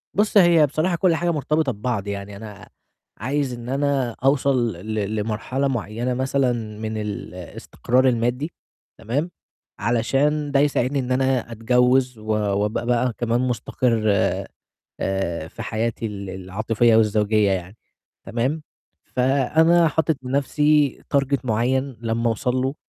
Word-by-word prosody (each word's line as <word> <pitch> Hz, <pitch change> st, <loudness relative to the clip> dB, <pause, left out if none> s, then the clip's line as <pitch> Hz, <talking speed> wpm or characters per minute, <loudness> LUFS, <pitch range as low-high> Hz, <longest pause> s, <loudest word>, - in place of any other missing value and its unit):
بُص، 210 Hz, +1 st, +2 dB
هي 170 Hz, -4 st, +6 dB
بصراحة 160 Hz, +6 st, 0 dB
كل 170 Hz, 0 st, +2 dB
حاجة 175 Hz, +1 st, 0 dB
مرتبطة 150 Hz, -2 st, 0 dB
ببعض، 105 Hz, -1 st, -3 dB
يعني 100 Hz, 0 st, -5 dB
أنا 105 Hz, 0 st, -10 dB, 0.5 s
عايز 135 Hz, +3 st, -1 dB
إن 120 Hz, +1 st, -7 dB
أنا 135 Hz, -3 st, 0 dB
أوصل 135 Hz, -4 st, +2 dB
ل 110 Hz, -1 st, -2 dB
لمرحلة 115 Hz, +6 st, -1 dB
معيّنة 120 Hz, 0 st, -2 dB
مثلًا 125 Hz, -4 st, -1 dB
من 110 Hz, 0 st, -4 dB
الاستقرار 105 Hz, +5 st, -2 dB
المادّي 125 Hz, +6 st, 0 dB, 0.5 s
تمام، 140 Hz, +10 st, -2 dB, 0.5 s
علشان 135 Hz, +7 st, +1 dB
ده 140 Hz, -, +3 dB
يساعدني 140 Hz, -1 st, +1 dB
إن 130 Hz, 0 st, -3 dB
أنا 130 Hz, -2 st, +1 dB
أتجوِّز 125 Hz, +2 st, +2 dB
و 110 Hz, -, -13 dB
وأبقى 105 Hz, +1 st, 0 dB
بقى 125 Hz, 0 st, +1 dB
كمان 120 Hz, +1 st, 0 dB
مستقر 120 Hz, -1 st, 0 dB, 1.0 s
آآ 85 Hz, -4 st, -2 dB
في -, -, -8 dB
حياتي 115 Hz, 0 st, -2 dB
ال 100 Hz, -2 st, -6 dB
العاطفية 110 Hz, +5 st, +1 dB
والزوجية 105 Hz, -1 st, +3 dB
يعني 95 Hz, +2 st, -3 dB, 0.5 s
تمام، 130 Hz, +7 st, -1 dB, 0.4 s
فأنا 155 Hz, +6 st, +3 dB
حاطط 160 Hz, 0 st, 0 dB
لنَفْسي 145 Hz, +2 st, +1 dB
target 140 Hz, 0 st, +2 dB
معيّن 130 Hz, +3 st, 0 dB
لمّا 115 Hz, 0 st, 0 dB
أوصل 125 Hz, +3 st, -1 dB
له 130 Hz, +2 st, 0 dB
125 Hz, 125 wpm, -22 LUFS, 110-140 Hz, 1.0 s, هي